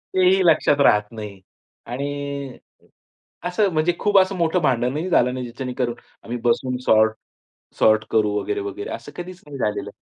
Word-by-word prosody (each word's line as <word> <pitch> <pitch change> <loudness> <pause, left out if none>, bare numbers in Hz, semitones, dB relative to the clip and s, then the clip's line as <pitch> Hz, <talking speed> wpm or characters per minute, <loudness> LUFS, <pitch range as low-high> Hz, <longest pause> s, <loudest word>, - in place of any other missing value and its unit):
ते 185 - +4
ही 190 0 +3
लक्षात 150 -3 +4
राहत 105 0 +2
नाही. 105 -4 -8 0.5
आणि 140 +1 -5 0.9
असं 200 +3 +2
म्हणजे 155 +2 +2
खूप 205 -1 +3
असं 190 +1 +2
मोठं 170 0 +1
भांडणही 135 +5 0
झालं 125 -5 +3
नाही 130 - -4
ज्याच्याने 125 +2 -6
करून 120 -2 0 0.3
आम्ही 120 +1 -4
बसून 125 +2 +1
सॉर्ट 110 0 +4 0.7
सॉर्ट 110 0 +4
करू 105 -2 +2
वगैरे, 100 - -2
वगैरे 100 0 -6
असं - - -7
कधीच 180 0 -8
नाही 145 -2 -8
झालेलं. 105 -4 -2
130 Hz, 160 wpm, -22 LUFS, 110-165 Hz, 0.9 s, ते